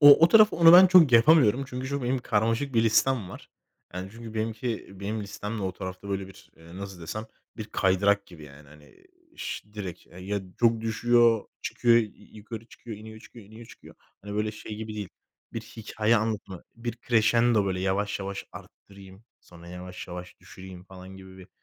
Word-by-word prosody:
O 145 -1 +9
o 170 - +5
taraf 215 +2 +6
onu 165 0 +7
ben 180 +2 +10
çok 175 -7 +6
yapamıyorum. 130 0 +5
Çünkü 130 -1 -5
şu 140 0 -3
benim 125 +2 0
karmaşık 115 +3 -1
bir 115 - +4
listem 115 -2 +2
var. - - -12 0.5
Yani 90 +1 -6
çünkü 115 -1 -10
benimki 110 +1 -3
benim 105 +2 -3
listem 105 +2 -6
de - - -4
o 95 -1 -2
tarafta, 95 +2 -8
böyle, 95 -1 -3
bir, 95 - -17
nasıl 90 +3 -10
desem, 110 +7 -6 0.3
bir 110 - -5
kaydırak 100 0 +1
gibi, 85 -4 -14
yani, 70 0 -15
hani, 75 - -19 0.3
ş 105 - -6
direkt 95 -5 -7
E, 90 - -15
ya 100 +2 -3 0.2
çok 115 -1 +3
düşüyor, 115 0 +3 0.2
çıkıyor, 120 -1 +2
y 120 - +4
y 105 - -12
yukarı 110 +1 -9
çıkıyor, 115 -3 -10
iniyor 110 +1 -11
çıkıyor, 115 -1 -14
iniyor 110 +3 -13
çıkıyor. - - -15 0.3
Hani, 105 +1 -7
böyle 105 +1 -1
şey 105 0 -8
gibi 110 0 -7
değil, 105 -3 -5 0.4
bir 115 - -4
hikâye 110 0 -1
anlatımı, 105 -4 -3
bir 115 0 -5
kreşendo, 115 -1 +2
böyle, 95 -1 -2
"Yavaş 100 +2 -1
yavaş 100 0 -5
arttırayım, 100 +1 -14 0.2
sonra 85 0 -15
yavaş 90 +1 -9
yavaş 90 0 -9
düşüreyim." 95 -1 -12
falan 95 0 -12
gibi 95 0 -13
bir, 95 0 -14
105 Hz, 185 wpm, -26 LUFS, 95-115 Hz, 0.5 s, ben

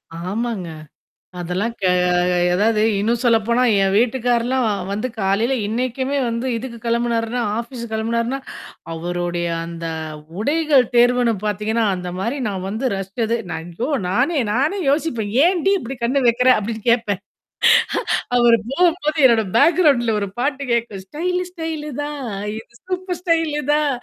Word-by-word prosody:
ஆமாங்க. 195 +2 -3 0.7
அதெல்லாம் 185 +7 -2
க - - -4 0.7
எததாவது 215 +3 +2 0.2
இன்னும் 230 +3 +1
சொல்லப்போனா, 235 +1 +3 0.2
என் 195 0 +2
வீட்டுக்கார்லாம் 245 +1 +1 0.3
வந்து 215 +5 -2
காலையில 200 +7 +1
இன்னைக்குமே 255 +4 -1
வந்து 235 +2 -2
இதுக்கு 235 0 -7
கிளம்புனாருன்னா, 235 0 0 0.2
ஆபீஸ் 235 0 -6
கிளம்புனாருன்னா, 230 +4 -1 0.5
அவருடைய 175 +1 -2 0.2
அந்த 170 0 -7 0.5
உடைகள் 290 0 +3
தேர்வுன்னு 245 -1 +4
பாத்தீங்கன்னா, 215 +2 0
அந்த 180 0 -5
மாரி 235 +9 -2
நான் 190 -2 -4
வந்து 220 +6 -3
ரஸ்சது, 220 +4 -2
நான் 160 +2 -5
ஐயோ! 250 +6 -2 0.2
நானே, 270 - +1
நானே 300 +11 +1
யோசிப்பேன். 275 -9 -1
"ஏன் 355 -3 +2
டி 395 - +5
இப்படி 255 0 -7
கண்ணு 265 +3 +2
வைக்கிற?" 245 +2 +3
அப்டின்னு 220 +1 -4
கேப்பேன். 210 -5 +1 1.2
அவரு 235 -1 +5
போகும்போது, 330 -1 +1
என்னோட 225 -3 +3
பேக்ரவுண்ட்ல 280 -10 +4
ஒரு 200 - -2
பாட்டு 280 +1 -1
கேக்கும். 220 -5 -2
ஸ்டைல 360 - -2
ஸ்டைலு 320 -3 -5
தான், 295 -1 -5 0.4
இது 225 - -11 0.2
சூப்பர் 365 -1 -3
ஸ்டைலு 325 -4 +1
தான், 300 -1 +2
235 Hz, 130 wpm, -20 LUFS, 215-280 Hz, 1.2 s, டி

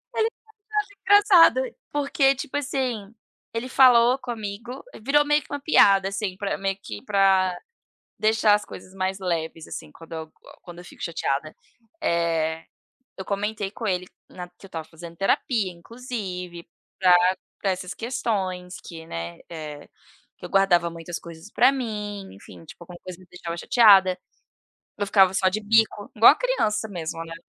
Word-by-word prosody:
Ele 440 - +2
me 450 - +1 0.5
achava 420 -1 +1
engraçada. 410 +5 +5 0.2
Porque, 280 -1 +2
tipo 265 +1 -6
assim, 255 -7 -3 0.4
ele 230 +3 -4
falou 250 -1 +5
comigo, 230 +1 -6 0.2
virou 295 +4 +3
meio 295 0 +2
que - - -19
uma 285 - -3
piada, 195 -10 +5
assim, 195 -1 -3
pra 200 -1 -2
meio 195 0 -2
que 105 - -8
para 190 -2 +3 0.6
deixar 215 0 +3
as 210 - 0
coisas 185 +1 -12
mais 190 0 -2
leves, 165 -3 -3
assim. 150 - -8
Quando 165 +1 -15
eu 160 -1 -7 0.3
quando 175 -1 -12
eu - - -13
fico - - -13
chateada, 155 -2 -2 0.5
eh, 165 -1 0 0.5
eu 190 - -5
comentei 205 0 -3
com 220 +2 -6
ele 185 -2 -1 0.2
na 180 -1 -8
que 180 +2 -17
eu - - -17
estava 160 -3 -7
fazendo 170 +1 -11
terapia, 195 +1 0
inclusive, 180 -4 -7 0.3
pra 185 -2 +5 0.5
pra 195 - 0
essas 185 0 -5
questões 190 -6 -3
que, 165 -1 -10
né, 85 - -6
eh, 155 -3 -8 0.5
que - - -13
eu - - -13
guardava 180 -3 +3
muitas 165 +1 -7
coisas 170 +3 -12
para 255 +3 +5
mim, 210 -6 -5
enfim. 90 -3 -14
Tipo, 175 - -13
alguma 175 +1 -11
coisa 185 -1 -9
me 185 - -17
deixava 170 -1 -6
chateada, 195 -3 +5 0.8
eu 205 - 0
ficava 190 -2 +4
só 190 -1 +3
de 200 +3 -2
bico, 215 -1 +2
igual 225 +2 +9
a - - -5
criança 280 - 0
mesmo, 165 -4 -5
né. 165 0 -8
195 Hz, 165 wpm, -24 LUFS, 175-230 Hz, 0.8 s, igual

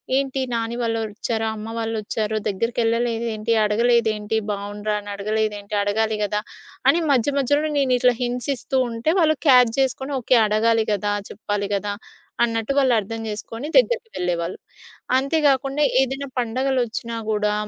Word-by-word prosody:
ఏంటి? 270 0 0
నాని 230 0 -2
వాళ్ళు 225 -1 0
వచ్చారు, 220 +1 -3
అమ్మ 215 0 -7
వాళ్ళు 225 0 -2
వచ్చారు 215 +1 -2
దగ్గరకేళ్ళలేదు 230 +2 0
ఏంటి? 215 +2 0
అడగలేదేంటి? 220 -1 +2
బాగుండ్రా 205 +1 -3
అని 205 - -10
అడగలేదేంటి? 210 0 -2
అడగాలి 220 +1 0
గదా! 210 +1 -1 0.5
అని 340 - +4
మధ్యమధ్యలోనే 285 +3 +1
నేను 260 -2 +3
ఇట్లా 250 0 +4
హింట్సిస్తూ 250 +2 -2
ఉంటే, 230 +6 -2
వాళ్ళు 310 -2 +3
క్యాచ్ 250 -3 +6
చేసుకొని 265 +1 -1
ఓకే 245 0 +3
అడగాలి 220 +1 +2
కదా! 205 0 -1 0.2
చెప్పాలి 205 -1 -3
కదా! 205 +1 -2 0.5
అన్నట్టు 230 +2 0
వాళ్ళు 265 -3 +4
అర్థం 225 +3 -5
చేసుకొని 225 +5 -6
దగ్గరికి 480 -2 +2
వెళ్ళేవాళ్ళు. 175 0 -2 0.6
అంతే 275 +5 0
గాకుండా 275 +2 +1 0.2
ఏదైనా 270 +1 -2
పండగలొచ్చినా 240 -1 -1
గూడా 210 -1 +1
230 Hz, 135 wpm, -22 LUFS, 210-260 Hz, 0.6 s, క్యాచ్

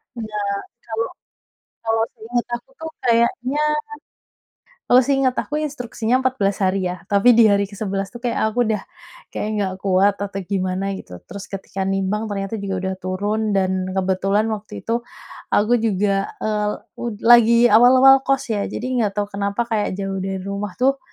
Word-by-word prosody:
Enggak. 210 -3 -3 0.3
Kalau 225 0 -2 0.8
kalau 225 0 +2
seingat 235 +2 -2
aku 240 - -25
tuh 320 0 -6 0.2
kayaknya 245 +4 +2 1.3
kalau 250 +1 +6
seingat 270 -1 +1
aku 295 - -3
instruksinya 245 -5 -2
14 255 -7 0
hari 190 0 +1
ya, 180 - -3 0.2
tapi 200 +5 +6
di 230 -1 +7
hari 200 0 +3
ke - - -10
11 195 -1 -2
tuh 240 - -8
kayak 240 - -1
aku 240 +1 +1
udah, 215 -3 0 0.5
kayak, - - -3
enggak 195 -2 -1
kuat 195 +1 +3
atau 200 -1 -4
gimana 190 0 -1
gitu, 90 - -10
terus 200 -1 -9
ketika 195 0 -6
nimbang 195 +3 -1
ternyata 195 +1 -3
juga 195 -1 -3
udah 190 0 -2
turun, 195 +4 -2
dan 190 -1 +2 0.2
kebetulan 195 +2 +1
waktu 215 0 -8
itu, 230 - -1 0.6
aku 215 +4 +3
juga, 200 -2 0
eee, 210 -1 0
el 210 - 0 0.3
ud 235 -3 -3
lagi 235 0 +7
awal-awal 255 +4 +8
kos 275 0 +2
ya. 205 -1 -1
Jadi - - -5
enggak 210 -3 +1
tahu 205 0 0
kenapa 200 +2 -1
kayak 210 -3 0
jauh 195 -1 -3
dari 190 0 -3
rumah 200 -1 -4
tuh, 270 +2 +2
210 Hz, 165 wpm, -21 LUFS, 195-235 Hz, 1.3 s, awal-awal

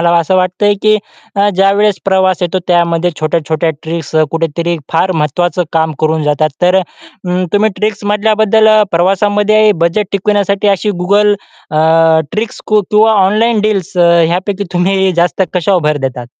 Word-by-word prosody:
मला 170 0 +2
असं 170 +3 0
वाटतंय 185 +3 +1
की 215 0 +3 0.4
अ, 200 +1 +2
ज्यावेळेस 195 +2 +1
प्रवास 190 -2 +1
येतो, 180 +1 -1
त्यामध्ये 170 0 +1
छोट्या-छोट्या 160 +1 -1
ट्रिक्स 160 -1 -5 0.2
कुठेतरी 165 +1 -2 0.2
फार 180 +3 +1
महत्त्वाचं 170 +3 -1
काम 160 -1 0
करून 155 0 0
जातात. 150 +1 +1
तर 180 +1 +3
अ, 190 - +2 0.7
तुम्ही 210 +1 +2
ट्रिक्समधल्या 210 0 -1
बद्दल 220 +1 +3 0.2
प्रवासामध्ये 205 +4 +2
बजेट 195 +4 0
टिकविण्यासाठी 200 0 0
अशी 200 +2 0
Google 205 +2 +2 0.4
अ, 155 - -3
मधल्या 165 +7 +1
किंवा 220 +1 +4
ऑनलाईन 215 +3 +2
डील्स 205 -4 -2
अ, 170 -1 +4 0.2
ह्यापैकी 185 +4 -2
तुम्ही 190 +1 +1
जास्त 175 +3 0
कशावर 180 0 +1
भर 150 -1 +1
देतात? 125 -2 -7
185 Hz, 145 wpm, -12 LUFS, 165-205 Hz, 0.7 s, किंवा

